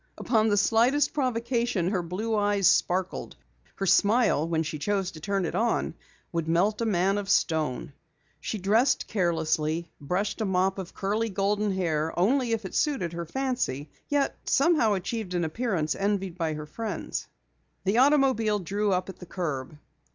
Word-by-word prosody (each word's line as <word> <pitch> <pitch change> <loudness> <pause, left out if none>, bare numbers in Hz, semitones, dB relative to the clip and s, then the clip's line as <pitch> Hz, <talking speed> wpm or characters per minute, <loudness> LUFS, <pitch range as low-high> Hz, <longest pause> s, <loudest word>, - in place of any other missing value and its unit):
Upon 220 -2 +2
the 205 - +2
slightest 245 +7 +3
provocation, 235 - 0
her 190 -3 0
blue 200 +7 -2
eyes 205 -2 +2
sparkled; 185 0 +1 0.4
her 195 - -2
smile 205 -5 +3
when 165 -1 0
she 155 -1 -5
chose 195 +2 -1
to 160 - -11
turn 195 +3 -1
it 160 - -3
on, 225 +5 0 0.4
would 165 -2 -2
melt 195 +7 +2
a 230 - +1
man 195 0 +2
of 200 -1 -6
stone. 155 -6 0 0.5
She 220 - -4
dressed 220 +7 +2
carelessly, 165 -3 0
brushed 190 +9 -2
a - - +1
mop 190 0 +1
of 185 -2 -7
curly, 215 +3 -1
golden 205 +1 0
hair 165 -4 -1
only 240 +7 +2
if 225 -2 -1
it 190 - -6
suited 265 - 0
her 170 -1 -5
fancy, 245 - -2 0.2
yet 285 -1 +1
somehow 275 -7 +3
achieved 195 0 -3
an 175 - +1
appearance 165 -4 -1
envied 195 -3 -1
by 165 -3 -2
her 150 0 -6
friends. 220 +8 -5 0.6
The 200 +5 +2
automobile 260 -6 +4
drew 200 +2 -1
up 185 0 0
at 190 - -9
the 180 - -10
curb. 150 -6 -4
195 Hz, 165 wpm, -27 LUFS, 170-225 Hz, 0.6 s, automobile